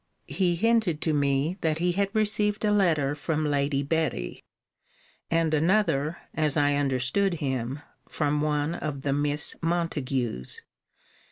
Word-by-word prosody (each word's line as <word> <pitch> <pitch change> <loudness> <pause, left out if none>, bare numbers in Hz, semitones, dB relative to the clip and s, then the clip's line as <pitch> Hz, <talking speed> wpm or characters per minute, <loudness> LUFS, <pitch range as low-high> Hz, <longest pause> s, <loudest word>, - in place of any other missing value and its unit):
He 175 +4 +1
hinted 220 -5 +2
to 160 - +1
me, 145 +4 +1
that 155 -1 +1
he 175 +2 +1
had 195 +2 0
received 210 0 +1
a 210 - +3
letter 160 -9 +2
from 155 +1 -2
Lady 140 -1 0
Betty, 150 - -2 0.9
and 165 -1 +1
another 160 -2 +2 0.2
(as 155 -1 +1
I 145 -1 +3
understood 145 +7 +1
him) 130 -2 -3 0.3
from 145 0 0
one 150 +1 0
of 150 -5 -5
the 140 - 0
Miss 145 +1 +2
Montagues. 140 - -2
150 Hz, 135 wpm, -27 LUFS, 140-175 Hz, 0.9 s, a